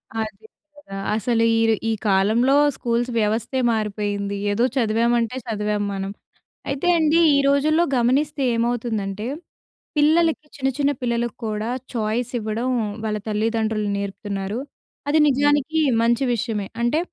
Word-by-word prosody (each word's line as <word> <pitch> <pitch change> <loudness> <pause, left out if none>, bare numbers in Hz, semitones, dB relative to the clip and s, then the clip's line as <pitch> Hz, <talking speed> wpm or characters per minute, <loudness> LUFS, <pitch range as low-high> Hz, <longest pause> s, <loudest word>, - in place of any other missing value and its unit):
అదే 220 -1 -4 0.3
కదా! 195 -10 -10 0.2
అసలు 230 +1 +1 0.2
ఈర్ 225 0 +3 0.2
ఈ - - +2 0.2
కాలంలో 220 +8 +3 0.2
స్కూల్స్ 240 +1 -1
వ్యవస్థే 225 +4 0
మారిపోయింది. 205 -2 -2
ఏదో 215 +4 +1
చదివామంటే 235 0 +1
చదివాం 210 -1 -1
మనం. 195 0 -4 0.6
అయితే 280 +5 -2
అండీ 315 +1 +3 0.2
ఈ - - +4
రోజుల్లో 305 +4 +3
గమనిస్తే 275 +4 +1
ఏమవుతుందంటే 225 -4 -2 0.7
పిల్లలకి 310 +1 +3
చిన్న 270 -1 0
చిన్న 285 0 +2
పిల్లలకు 235 0 -1
కూడా 215 +1 -3 0.3
ఛాయిస్ 230 +2 -1
ఇవ్వడం 220 +3 -2 0.4
వాళ్ళ 210 -1 -1
తల్లిదండ్రులు 220 0 0
నేర్పుతున్నారు. 200 +1 -4 0.5
అది 305 +2 +3
నిజానికి 290 +3 +2 0.2
మంచి 235 +3 +2
విషయమే. 220 -3 -2
అంటే 240 +7 +2
230 Hz, 120 wpm, -22 LUFS, 210-265 Hz, 0.7 s, ఈ